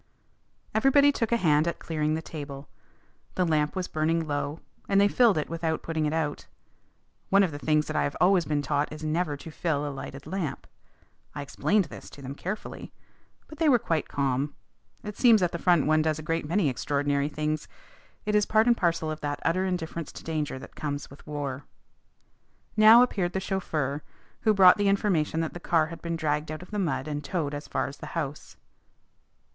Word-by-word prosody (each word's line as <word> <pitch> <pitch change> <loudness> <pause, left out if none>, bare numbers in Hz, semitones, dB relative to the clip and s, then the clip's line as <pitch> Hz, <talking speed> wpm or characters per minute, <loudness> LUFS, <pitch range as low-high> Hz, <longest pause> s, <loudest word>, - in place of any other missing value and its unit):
Everybody 270 +5 +5
took 230 -5 -2
a 235 - +4
hand 155 -5 +3
at 170 - -1
clearing 155 -1 -1
the 160 - -4
table. 145 -3 -7 0.7
The 180 - +2
lamp 150 -1 +1
was 185 -1 -2
burning 160 +1 0
low, 145 +1 -3 0.3
and 195 - +4
they 200 - +6
filled 225 -2 +4
it 150 - -1
without 165 -1 -2
putting 160 -2 -1
it - - -1
out. 155 -2 -2 0.8
One 200 +1 +5
of 180 - 0
the 145 - -6
things 150 0 +2
that - - -5
I - - +2
have 70 - -2
always 180 -2 +4
been 145 -1 -1
taught 145 +1 0
is 155 0 -8
never 155 -1 -1
to 160 - -10
fill 150 -2 -1
a 145 - -4
lighted 135 0 -8
lamp. 160 -4 -4 0.7
I 145 - -4
explained 200 +7 +1
this - - -11
to 140 - -13
them 135 +1 -5
carefully. 190 +8 -6 0.6
But 310 - -12
they 320 -2 +4
were 255 - +6
quite 165 -8 -1
calm. 140 +1 -1 0.5
It 210 -1 -7
seems 225 -6 +6
at 175 - +1
the 170 - -4
front 175 -4 +3
one 155 +1 +3
does 155 -1 0
a 155 - -7
great 165 0 -2
many 175 +1 +2
extraordinary 140 +2 0
things. 155 0 -2 0.6
It 210 - -1
is 210 -1 +3
part 220 0 +4
and 240 -1 +5
parcel 170 -5 0
of 155 - -6
that 145 0 -3
utter 185 +3 +2
indifference 170 -3 -3
to - - -10
danger 155 -4 -2
that 130 - -11
comes 145 -2 -4
with 140 - -15
war. 145 -2 -4 1.1
Now 220 +3 +8
appeared 185 -8 -1
the 190 - 0
chauffeur, 155 -7 -2 0.4
who 215 -1 +2
brought 185 -1 +8
the 205 -1 +1
information 175 -6 +1
that 160 - -3
the 175 - -7
car 165 -2 +2
had - - -10
been 170 0 -3
dragged 150 -1 -1
out 155 +3 -6
of 180 - -15
the 210 - -2
mud 160 -7 -1
and 145 -1 -3
towed 150 -3 -2
as 145 +1 -6
far - - -1
as 140 +1 -7
the 150 - -8
house. 150 -3 -5
160 Hz, 205 wpm, -27 LUFS, 145-185 Hz, 1.1 s, Now